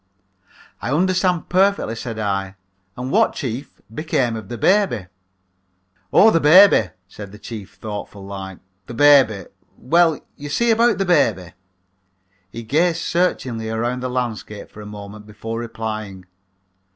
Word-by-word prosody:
"I 120 Hz, -, -3 dB
understand 180 Hz, +1 st, +1 dB
perfectly," 190 Hz, -, +1 dB
said 115 Hz, -1 st, -6 dB
I, 100 Hz, -2 st, -2 dB, 0.4 s
"and 125 Hz, +2 st, -4 dB
what, -, -, +3 dB
chief, 130 Hz, +1 st, -6 dB
became 130 Hz, -5 st, -1 dB
of 110 Hz, -2 st, -8 dB
the 120 Hz, -, -5 dB
baby?" 190 Hz, -, +2 dB, 1.1 s
"Oh, 220 Hz, +2 st, +6 dB
the 165 Hz, -, +3 dB
baby," 160 Hz, -, +6 dB, 0.2 s
said 100 Hz, +1 st, -10 dB
the 105 Hz, -, -12 dB
chief, 105 Hz, -2 st, -9 dB
thoughtful 105 Hz, -2 st, -7 dB
like; 95 Hz, -2 st, -7 dB, 0.3 s
"the 120 Hz, -, -8 dB
baby 130 Hz, -9 st, +5 dB, 0.3 s
well, 165 Hz, +3 st, +2 dB, 0.2 s
you 145 Hz, 0 st, -8 dB
see, 235 Hz, +11 st, +1 dB
about 230 Hz, 0 st, +3 dB
that 195 Hz, -, 0 dB
baby 115 Hz, -, +1 dB, 0.5 s
" 95 Hz, +1 st, -44 dB
he 115 Hz, -, -7 dB
gazed 160 Hz, +8 st, +1 dB
searchingly 130 Hz, -12 st, -1 dB
around 120 Hz, +3 st, -2 dB
the 130 Hz, 0 st, -4 dB
landscape 115 Hz, -4 st, -5 dB
for 105 Hz, -, -11 dB
a 105 Hz, -, -9 dB
moment 105 Hz, 0 st, -10 dB
before 115 Hz, +2 st, -6 dB
replying. 110 Hz, -5 st, -6 dB
115 Hz, 140 wpm, -20 LUFS, 105-160 Hz, 1.1 s, Oh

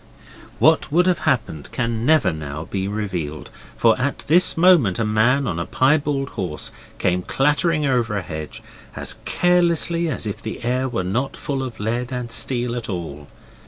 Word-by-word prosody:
What 160 Hz, -1 st, +3 dB
would 175 Hz, +4 st, +4 dB
have 180 Hz, -2 st, +2 dB
happened 110 Hz, -, -2 dB
can 115 Hz, -1 st, -2 dB
never 150 Hz, -, +4 dB
now 75 Hz, 0 st, -6 dB
be 95 Hz, +2 st, -3 dB
revealed. 90 Hz, -8 st, -4 dB, 0.3 s
For 115 Hz, -1 st, +4 dB
at 140 Hz, +2 st, -2 dB
this 175 Hz, +3 st, +3 dB
moment 165 Hz, -, +5 dB
a 115 Hz, -, 0 dB
man 120 Hz, +6 st, +2 dB
on 85 Hz, -7 st, -2 dB
a 85 Hz, -, -2 dB
piebald 140 Hz, 0 st, +1 dB
horse 90 Hz, -8 st, -5 dB, 0.3 s
came 90 Hz, 0 st, +1 dB
clattering 150 Hz, -, +1 dB
over 120 Hz, -6 st, +1 dB
a 95 Hz, -, -3 dB
hedge 80 Hz, -1 st, -7 dB, 0.3 s
as -, -, -1 dB
carelessly 170 Hz, -1 st, +2 dB
as 150 Hz, -, -3 dB
if 105 Hz, -, -4 dB
the 110 Hz, -, -6 dB
air 130 Hz, +2 st, 0 dB
was 105 Hz, -7 st, -2 dB
not 125 Hz, +9 st, -2 dB
full 135 Hz, -2 st, -3 dB
of 125 Hz, -4 st, -6 dB
lead 120 Hz, +4 st, -2 dB
and 125 Hz, -2 st, -4 dB
steel 120 Hz, 0 st, 0 dB
at 120 Hz, -3 st, -5 dB
all. 80 Hz, -6 st, -5 dB
120 Hz, 170 wpm, -21 LUFS, 95-145 Hz, 0.3 s, moment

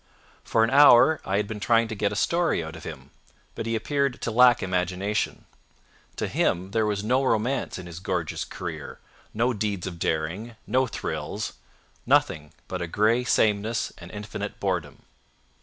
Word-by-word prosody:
For 115 Hz, -, +2 dB
an 115 Hz, -, +1 dB
hour 140 Hz, +1 st, +7 dB
I 95 Hz, -, 0 dB
had 105 Hz, 0 st, 0 dB
been 105 Hz, 0 st, -5 dB
trying 115 Hz, +2 st, +3 dB
to -, -, -3 dB
get 100 Hz, -1 st, 0 dB
a -, -, -4 dB
story 170 Hz, -, +1 dB
out 80 Hz, 0 st, -7 dB
of 80 Hz, -, -11 dB
him, 70 Hz, -3 st, -9 dB, 0.4 s
but 115 Hz, -, -5 dB
he 115 Hz, -, 0 dB
appeared 140 Hz, +2 st, -1 dB
to 115 Hz, -, -1 dB
lack 125 Hz, +2 st, +5 dB
imagination. 95 Hz, +3 st, -1 dB, 0.7 s
To -, -, -2 dB
him 90 Hz, +2 st, 0 dB
there 110 Hz, 0 st, +1 dB
was 105 Hz, -1 st, -1 dB
no 130 Hz, +5 st, +2 dB
romance 125 Hz, +2 st, 0 dB
in 90 Hz, -, -8 dB
his 85 Hz, -1 st, -8 dB
gorgeous 90 Hz, -4 st, -2 dB
career, -, -, -7 dB, 0.3 s
no 120 Hz, +3 st, +1 dB
deeds 100 Hz, -4 st, -2 dB
of 90 Hz, -3 st, -6 dB
daring, 85 Hz, +11 st, -2 dB
no 130 Hz, 0 st, +2 dB
thrills—nothing 75 Hz, -8 st, -2 dB, 0.2 s
but 90 Hz, -1 st, -4 dB
a 85 Hz, -, -2 dB
gray 110 Hz, +7 st, +2 dB
sameness 110 Hz, 0 st, +1 dB
and 85 Hz, -, -10 dB
infinite 105 Hz, 0 st, -6 dB
boredom. 90 Hz, -8 st, -3 dB
105 Hz, 165 wpm, -26 LUFS, 90-115 Hz, 0.7 s, hour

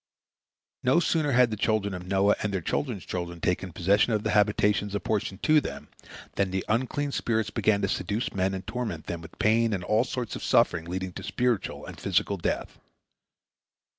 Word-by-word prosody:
No 130 Hz, +6 st, +4 dB
sooner 155 Hz, -4 st, +1 dB
had 125 Hz, -1 st, +5 dB
the -, -, -1 dB
children 105 Hz, -1 st, 0 dB
of 90 Hz, 0 st, -7 dB
Noah 100 Hz, +2 st, +3 dB
and 105 Hz, -, -1 dB
their 95 Hz, -, -1 dB
children's 110 Hz, -, -2 dB
children 85 Hz, -1 st, -4 dB
taken 90 Hz, +2 st, -1 dB
possession 100 Hz, +7 st, +2 dB
of 105 Hz, -1 st, 0 dB
the -, -, 0 dB
habitations 105 Hz, -1 st, +2 dB
apportioned 100 Hz, -1 st, -2 dB
to 155 Hz, -1 st, +5 dB
them, -, -, -7 dB, 0.5 s
than 100 Hz, -1 st, +2 dB
the 95 Hz, 0 st, -2 dB
unclean 130 Hz, +5 st, 0 dB
spirits 110 Hz, -5 st, -1 dB
began 100 Hz, -2 st, +1 dB
to -, -, +3 dB
seduce 100 Hz, +5 st, -2 dB
men 95 Hz, 0 st, 0 dB
and 95 Hz, 0 st, -6 dB
torment 110 Hz, -11 st, -4 dB
them 85 Hz, -1 st, -5 dB
with 80 Hz, 0 st, -13 dB
pain 115 Hz, +1 st, +3 dB
and 95 Hz, -3 st, -2 dB
all 105 Hz, +5 st, +2 dB
sorts 125 Hz, -4 st, -4 dB
of -, -, -7 dB
suffering 80 Hz, -1 st, +3 dB
leading 90 Hz, +1 st, -4 dB
to -, -, -7 dB
spiritual 125 Hz, -5 st, -1 dB
and -, -, -9 dB
physical 100 Hz, -, +1 dB
death. 85 Hz, -, -3 dB
105 Hz, 185 wpm, -27 LUFS, 95-115 Hz, 0.5 s, had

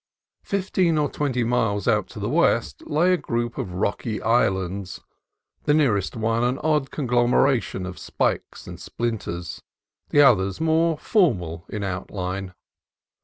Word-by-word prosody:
Fifteen 185 Hz, -4 st, 0 dB
or 145 Hz, -2 st, 0 dB
twenty 130 Hz, -4 st, -1 dB
miles 110 Hz, -4 st, 0 dB
out -, -, +2 dB
to -, -, -10 dB
the -, -, -2 dB
west -, -, +1 dB
lay 170 Hz, +5 st, +3 dB
a -, -, +3 dB
group 120 Hz, -5 st, -3 dB
of 90 Hz, -, -4 dB
rocky 105 Hz, +3 st, -2 dB
islands, 95 Hz, -4 st, 0 dB, 0.7 s
the 145 Hz, -, +4 dB
nearest 115 Hz, -11 st, +1 dB
one 115 Hz, +1 st, 0 dB
an 125 Hz, +2 st, +1 dB
odd 150 Hz, -3 st, +1 dB
conglomeration 120 Hz, -5 st, +1 dB
of 90 Hz, 0 st, -7 dB
spikes -, -, -2 dB
and -, -, -9 dB
splinters, 100 Hz, -8 st, -4 dB, 0.5 s
the 145 Hz, -, +3 dB
others 100 Hz, -9 st, +4 dB
more 160 Hz, 0 st, +2 dB
formal 90 Hz, -, +1 dB
in 105 Hz, -1 st, -4 dB
out 95 Hz, -1 st, -4 dB
line. 95 Hz, -1 st, -4 dB
120 Hz, 140 wpm, -23 LUFS, 95-145 Hz, 0.7 s, the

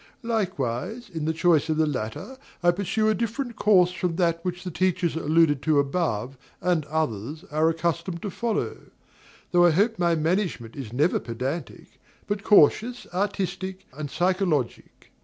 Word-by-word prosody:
Likewise, 205 Hz, -, -2 dB
in 160 Hz, -2 st, -3 dB
the 160 Hz, -, +1 dB
choice 165 Hz, -1 st, +2 dB
of 155 Hz, -, +1 dB
the 160 Hz, -, +3 dB
latter, 145 Hz, -, -4 dB, 0.2 s
I 175 Hz, -, +6 dB
pursue 200 Hz, +4 st, 0 dB
a 215 Hz, -, +4 dB
different 235 Hz, +2 st, -3 dB
course 185 Hz, -5 st, +4 dB
from 180 Hz, -2 st, -2 dB
that 170 Hz, -2 st, +1 dB
which 180 Hz, 0 st, -4 dB
the 180 Hz, -, -5 dB
teachers 185 Hz, -1 st, 0 dB
alluded 160 Hz, -2 st, +3 dB
to 155 Hz, -1 st, +2 dB
above 135 Hz, -4 st, -1 dB, 0.2 s
and 175 Hz, -4 st, +1 dB
others 150 Hz, -, -3 dB
are 155 Hz, +2 st, +3 dB
accustomed 170 Hz, +1 st, -2 dB
to 205 Hz, -, -3 dB
follow; 230 Hz, +2 st, -2 dB, 0.7 s
though 175 Hz, -1 st, +5 dB
I -, -, +6 dB
hope 205 Hz, +7 st, +2 dB
my 170 Hz, -1 st, +3 dB
management 160 Hz, -, -1 dB
is 130 Hz, -6 st, -7 dB
never 145 Hz, +8 st, +2 dB
pedantic, 130 Hz, +6 st, -6 dB, 0.2 s
but 205 Hz, -1 st, -3 dB
cautious, 220 Hz, +5 st, +4 dB
artistic, 190 Hz, -1 st, -2 dB
and 150 Hz, -1 st, -5 dB
psychologic. 175 Hz, -, -1 dB
170 Hz, 155 wpm, -25 LUFS, 150-190 Hz, 0.7 s, I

